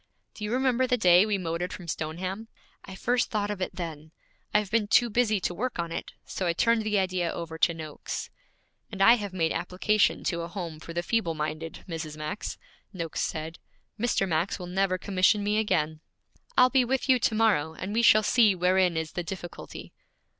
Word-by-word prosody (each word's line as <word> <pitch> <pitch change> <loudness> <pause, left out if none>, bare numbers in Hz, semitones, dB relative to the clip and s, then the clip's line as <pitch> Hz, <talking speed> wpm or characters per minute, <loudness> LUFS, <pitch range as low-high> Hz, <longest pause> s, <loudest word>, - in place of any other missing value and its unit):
'Do 210 - -9
you 210 - -2
remember 255 0 +2
the 250 -1 +2
day 180 -1 +6
we 210 -2 +1
motored 175 0 -3
from 180 -3 -8
Stoneham? 185 +7 -4 0.4
I 190 - -9
first 245 +5 0
thought 210 -1 -1
of 200 -2 -5
it 185 - -3
then. 160 -3 -6 0.4
I - - +4
have 210 -2 -2
been 220 -2 +2
too 240 +2 +4
busy 220 -2 +2
to 175 - -1
work 245 +8 -3
on 170 -1 -3
it, - - -5
so 185 - -3
I 170 - +2
turned 230 +5 +2
the 215 -1 0
idea 185 -3 0
over 165 -1 -6
to 170 - +4
Noakes.' 155 -2 -6 0.6
'And 200 - -7
I 210 +4 +8
have 205 -5 -2
made 165 -3 0
application 190 +4 +1
to 170 -2 -1
a 170 - -4
home 170 -3 -6
for 165 - -9
the 170 +1 -2
feeble 185 -6 0
minded, 155 +1 -5
Mrs. 160 -3 -5
Max,' 155 +7 -5 0.3
Noakes 170 -5 -4
said. 160 +1 -4 0.4
'Mr. 230 -4 +1
Max 170 +2 0
will 180 - -7
never 185 +1 0
commission 200 +2 +2
me 210 +1 +1
again.' 155 -7 0 0.6
'I'll 255 - +6
be 265 -2 +4
with 260 +2 -1
you 260 -2 +5
to 225 - +1
morrow, 190 -9 +2
and 190 +5 -5
we 230 - +2
shall 215 -2 +6
see 220 -3 +4
wherein 180 -1 +2
is 160 -1 -3
the 175 - -3
difficulty.' 175 0 -8
185 Hz, 205 wpm, -27 LUFS, 170-215 Hz, 0.6 s, I